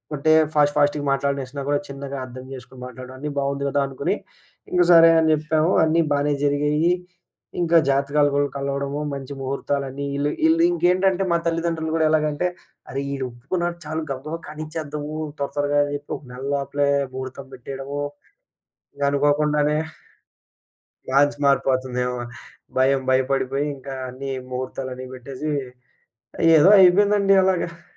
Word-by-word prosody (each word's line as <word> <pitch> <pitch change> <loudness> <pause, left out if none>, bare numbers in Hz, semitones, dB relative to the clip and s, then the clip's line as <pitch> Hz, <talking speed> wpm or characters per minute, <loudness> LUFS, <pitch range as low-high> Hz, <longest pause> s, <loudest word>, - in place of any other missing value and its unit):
అంటే 150 +2 +2 0.2
ఫాస్ట్ 145 -1 +3
ఫాస్ట్‌గా 145 0 +2
మాటలనేసినా 140 0 -2
కూడా 145 0 +2
చిన్నగా 140 0 -6
అర్థం 130 0 -10
చేసుకొని 130 0 -11
మాట్లాడడం 125 +1 -9
అన్నీ 150 +3 -4
బావుంది 140 0 -1
కదా! 140 - 0
అనుకుని 135 -1 -2 0.6
ఇంక 180 - +3
సరే 165 -1 +8
అని 160 0 +2
చెప్పాము 155 +2 +1
అన్నీ 160 +1 +3
బానే 145 +1 +2
జరిగాయి. 150 +3 +2 0.7
ఇంకా 170 0 +4
జాతకాలు 140 +2 +2
కూడా 145 0 +2
కలవడము 140 +1 -3
మంచి 140 0 -6
ముహూర్తాలన్నీ 140 +1 -3
ఈళ్ళు 140 +1 0 0.2
ఈళ్ళింకేంటంటే 195 - +3
మా 170 - +4
తల్లిదండ్రులు 165 -1 -1
కూడా 160 -1 +2
ఎలాగంటే 155 +1 +1 0.4
అరె! 135 - -3
ఈడొప్పుకున్నాడు 140 +7 -3
చాలు 155 +1 -3
గబగబా 145 +5 -5
కనిచ్చేద్దాము. 155 -1 -6 0.2
త్వర 140 0 -2
త్వరగా 145 0 +1
అని 145 0 -4
చెప్పి 145 0 -8
ఒక - - -18
నెల 125 +1 -8
లోపలే 140 0 0 0.2
ముహూర్తం 130 +1 -7
పెట్టేయడము 135 +3 -6 1.1
అనుకోకుండానే 150 +1 +2 1.3
మ్యాట్చ్ 145 +2 +3
మారిపోతుందేమో 130 -2 +1 0.6
భయం. 135 +1 +3
భయపడిపోయి 135 +1 0
ఇంకా 135 0 -8 0.2
అన్ని 135 +2 -6 0.2
ముహూర్తాలన్ని 130 0 -5
పెట్టేసి 135 +4 -5 1.1
ఏదో 155 +5 +6
అయిపోయిందండి 200 +2 +5
అలాగా. 170 -3 -1
145 Hz, 125 wpm, -22 LUFS, 135-155 Hz, 1.3 s, సరే